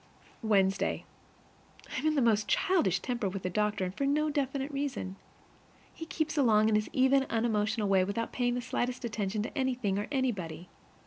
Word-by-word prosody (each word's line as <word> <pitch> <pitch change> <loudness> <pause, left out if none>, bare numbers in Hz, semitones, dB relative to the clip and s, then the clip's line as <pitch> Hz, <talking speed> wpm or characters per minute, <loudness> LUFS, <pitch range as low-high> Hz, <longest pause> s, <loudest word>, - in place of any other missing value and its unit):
Wednesday. 195 -3 +1 0.9
I - - 0
am 310 - 0
in 310 - +2
the 275 - +3
most 215 -2 +3
childish 195 - +2
temper 240 -5 -1
with 190 0 -6
the 185 - -2
doctor, 210 0 0
and 180 - -4
for 275 +4 0
no 295 +2 +2
very 305 -1 -1
definite 275 0 -1
reason. 275 -9 -3 0.8
He 325 - -8
keeps 315 -1 -1
along 220 -4 +4
his 210 0 +1
even, 270 -1 +3
unemotional 220 -1 0
way 190 -1 +4
without 200 +4 -3
paying 245 -1 +1
the 245 - -2
slightest 250 0 -2
attention 210 -2 -2
to - - -6
anything 245 -7 0
or 205 - -3
anybody. 185 - -2
230 Hz, 180 wpm, -30 LUFS, 205-270 Hz, 0.9 s, along